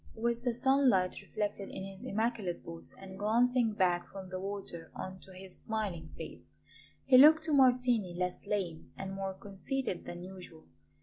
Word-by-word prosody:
With 235 +1 0
the 245 -2 +1
sunlight 255 -8 +3
reflected 205 -2 -3
in - - -6
his 195 0 -9
immaculate 220 -4 -1
boots 165 0 -7
and 190 0 -10
glancing 235 +2 +3
back 180 -3 +1
from 190 -1 -8
the 185 0 -4
water 195 -4 -5
on 185 0 -6
to 190 - -14
his 185 0 -10
smiling 195 -8 -3
face, - - -9 0.6
he 255 -2 +7
looked 310 +3 +8
to 315 -1 0
Martini 250 -8 +4
less 180 0 -2
lame 185 -6 -2
and 195 0 -5
more 195 0 -3
conceited 200 +2 -4
than 175 0 -7
usual. 180 -3 -11
195 Hz, 165 wpm, -32 LUFS, 185-235 Hz, 0.6 s, looked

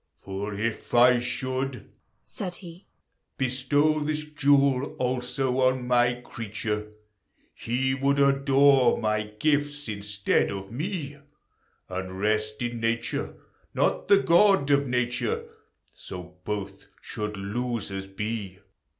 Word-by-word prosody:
For 100 +2 -5
if 115 +2 -3
T 125 +1 +6
should 130 0 -3 0.4
(said 180 -3 -6
he) 175 +1 -12 0.5
Bestow 140 +4 +1
this 150 0 -2
jewel 140 -2 +2
also 125 +1 -1
on 130 -1 +2
my 120 0 +3
creature, 105 -1 -4 0.6
He 130 +3 -1
would 140 +1 +1
adore 140 -2 +4
my 105 -1 -1
shifts 145 -1 0
instead 100 -1 0
of 95 0 -6
me, 150 - -4 0.7
And 95 0 -5
rest 110 +2 0
in 120 -1 -3
Nature, 115 0 -1 0.4
not - - +1
the 200 - +7
God 185 -4 +4
of 140 0 +3
Nature: 125 -1 -1 0.5
So 90 -1 -9
both 100 -1 -5
should 105 -1 -5
losers 100 -2 -3
be. 100 -1 -4
125 Hz, 110 wpm, -26 LUFS, 105-140 Hz, 0.7 s, the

